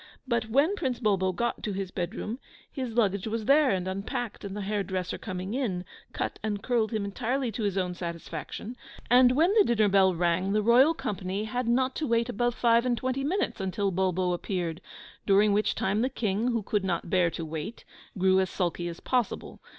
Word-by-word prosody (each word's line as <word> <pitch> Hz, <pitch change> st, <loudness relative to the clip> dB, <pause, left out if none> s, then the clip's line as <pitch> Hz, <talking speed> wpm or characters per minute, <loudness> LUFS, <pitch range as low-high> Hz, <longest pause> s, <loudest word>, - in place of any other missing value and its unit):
But 235 Hz, -3 st, 0 dB
when 285 Hz, -, +3 dB
Prince 255 Hz, -, -2 dB
Bulbo 195 Hz, -5 st, +2 dB
got 235 Hz, +7 st, -2 dB
to 210 Hz, -, -3 dB
his 190 Hz, -1 st, -4 dB
bed 175 Hz, -3 st, -3 dB
room, 230 Hz, +5 st, -4 dB, 0.3 s
his 260 Hz, -4 st, -4 dB
luggage 200 Hz, -3 st, +1 dB
was 220 Hz, 0 st, -2 dB
there 285 Hz, +2 st, +5 dB
and 185 Hz, -5 st, 0 dB
unpacked; 200 Hz, +4 st, -4 dB
and 200 Hz, 0 st, -5 dB
the -, -, -3 dB
hair 205 Hz, +1 st, -1 dB
dresser 185 Hz, -2 st, -3 dB
coming 185 Hz, 0 st, -5 dB
in, 205 Hz, -9 st, -2 dB, 0.3 s
cut -, -, -3 dB
and 210 Hz, -1 st, -3 dB
curled 235 Hz, -3 st, +1 dB
him 215 Hz, -3 st, -1 dB
entirely 245 Hz, +4 st, -1 dB
to 220 Hz, -, -5 dB
his 200 Hz, -2 st, -1 dB
own 180 Hz, -1 st, 0 dB
satisfaction; 170 Hz, -, -6 dB, 0.4 s
and 250 Hz, 0 st, +7 dB
when 330 Hz, +8 st, +3 dB
the 430 Hz, -2 st, +6 dB
dinner 220 Hz, -, +3 dB
bell 190 Hz, -2 st, +4 dB
rang, 175 Hz, +3 st, +1 dB
the 215 Hz, 0 st, +2 dB
royal 255 Hz, +8 st, +5 dB
company 200 Hz, -, -3 dB
had 245 Hz, +3 st, -2 dB
not 255 Hz, +2 st, +2 dB
to 310 Hz, -, -1 dB
wait 230 Hz, +1 st, +1 dB
above 240 Hz, +1 st, 0 dB
five 235 Hz, -1 st, +4 dB
and 245 Hz, -1 st, 0 dB
twenty 260 Hz, +2 st, -2 dB
minutes 345 Hz, -, -1 dB
until 195 Hz, +1 st, -1 dB
Bulbo 185 Hz, -1 st, +1 dB
appeared, 175 Hz, -2 st, -3 dB, 0.5 s
during 200 Hz, +1 st, +5 dB
which 210 Hz, +1 st, +1 dB
time 200 Hz, +3 st, 0 dB
the 255 Hz, -, +1 dB
King, 220 Hz, -3 st, -1 dB
who 230 Hz, -3 st, 0 dB
could 205 Hz, 0 st, 0 dB
not 170 Hz, -3 st, -2 dB
bear 180 Hz, -2 st, +3 dB
to 165 Hz, 0 st, -5 dB
wait, 160 Hz, +8 st, -6 dB, 0.3 s
grew 190 Hz, 0 st, +4 dB
as 190 Hz, -1 st, +1 dB
sulky 175 Hz, -1 st, -2 dB
as 170 Hz, 0 st, -7 dB
possible. 250 Hz, -3 st, -1 dB
210 Hz, 205 wpm, -28 LUFS, 185-240 Hz, 0.5 s, and